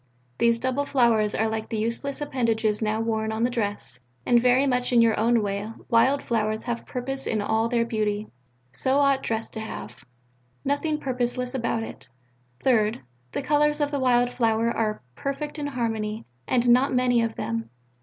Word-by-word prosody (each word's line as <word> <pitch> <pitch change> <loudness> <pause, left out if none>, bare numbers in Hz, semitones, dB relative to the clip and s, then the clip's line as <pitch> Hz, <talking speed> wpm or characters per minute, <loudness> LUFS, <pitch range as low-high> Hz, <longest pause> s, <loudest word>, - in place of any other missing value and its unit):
These 235 0 +4
double 260 +4 -1
flowers 230 -5 +3
are 220 - +1
like 220 0 -3
the 225 - -2
useless 235 +7 -2
appendages 225 -6 0
now 215 0 0
worn 220 -1 -1
on 220 +1 -1
the 245 - +2
dress, 205 - -3 0.3
and 240 -1 +4
very 250 +2 +4
much 250 -2 0
in 240 - +5
your 230 -1 +5 0.3
way. 205 +1 -2 0.2
Wild 260 +5 +3
flowers 220 -2 -1
have 240 -1 -4
purpose 270 +2 -4
in 220 - 0
all 220 +2 +1
their 235 -1 +2
beauty. 215 -2 -1 0.5
So 265 - +1
ought 275 -1 +3
dress 225 0 -2
to - - -6
have; 120 - -7 0.7
nothing 295 +2 0
purposeless 250 -1 -2
about 230 -3 -1
it. 130 - -9 0.5
Third: 225 - +2 0.3
the - - -3
colours 295 +1 +2
of 290 -1 0
the 285 - -1
wild 245 -1 +3
flower 230 -1 +2
are 215 - -1
perfect 290 - -4
in 290 - -2
harmony, 225 -5 -2 0.2
and 245 -1 +2
not 255 +3 +5
many 250 -1 +3
of 230 -1 -1
them. 115 0 -3
235 Hz, 175 wpm, -25 LUFS, 220-260 Hz, 0.7 s, in